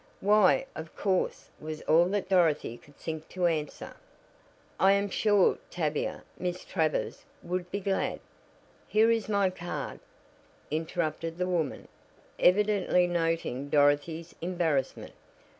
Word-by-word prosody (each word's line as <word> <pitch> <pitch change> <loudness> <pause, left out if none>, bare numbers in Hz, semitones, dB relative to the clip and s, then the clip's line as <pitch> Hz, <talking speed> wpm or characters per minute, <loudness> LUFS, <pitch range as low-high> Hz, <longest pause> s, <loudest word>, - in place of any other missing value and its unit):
"Why, 210 +4 +4
of 160 0 -8
course," 190 -2 -1
was 155 0 -6
all 165 +2 +5
that 195 +2 -1
Dorothy 165 -10 +2
could 145 +4 -19
think 160 -1 -6
to 185 -1 -1
answer. 155 -4 -2 0.8
"I 195 +1 +6
am 200 0 0
sure 205 -2 +3
Tavia 155 -4 -2 0.2
Miss 180 0 -3
Travers 160 -5 -1 0.2
would 180 0 -3
be 200 - -3
glad 195 0 -1 0.3
" - - -32
"Here 220 +2 +4
is 225 -2 0
my 200 -3 +2
card," 175 -1 -5 0.7
interrupted 160 +1 -2
the 180 - 0
woman, 165 -6 -2 0.5
evidently 195 -2 +3
noting 165 -6 -1
Dorothy's 145 +3 +2
embarrassment. 170 -5 -1
175 Hz, 125 wpm, -29 LUFS, 160-190 Hz, 0.8 s, I